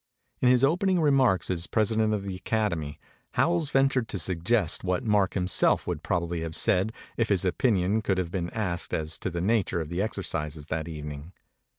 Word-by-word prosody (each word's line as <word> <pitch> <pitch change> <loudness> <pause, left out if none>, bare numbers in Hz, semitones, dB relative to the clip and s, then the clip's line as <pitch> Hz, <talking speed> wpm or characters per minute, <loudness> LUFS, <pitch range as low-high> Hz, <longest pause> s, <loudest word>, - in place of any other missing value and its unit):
In 125 - +5
his 125 0 +4
opening 180 +5 +3
remarks 135 - +3
as 85 -1 -1
President 110 0 +1
of 105 -2 -1
the 95 -1 -4
Academy, 90 -6 -2 0.3
Howells 170 -3 +2
ventured 135 -4 +2
to 100 - -4
suggest 90 +2 0
what 90 -1 -1
Mark 105 -3 +2
himself 90 -2 +2
would - - -3
probably 85 -1 -2
have 80 -1 -4
said 95 +4 +2 0.3
if 115 -1 +1
his 95 -2 +2
opinion 100 0 +1
could 95 -3 0
have 90 -2 -2
been 85 -2 -2
asked 90 -5 -2
as 80 0 -3
to - - -2
the 85 -1 -4
nature 100 -2 +1
of 80 -2 -4
the 85 +3 -2
exercises 80 -8 -3
that 80 0 -2
evening. 75 +1 -7
95 Hz, 185 wpm, -27 LUFS, 85-110 Hz, 0.3 s, In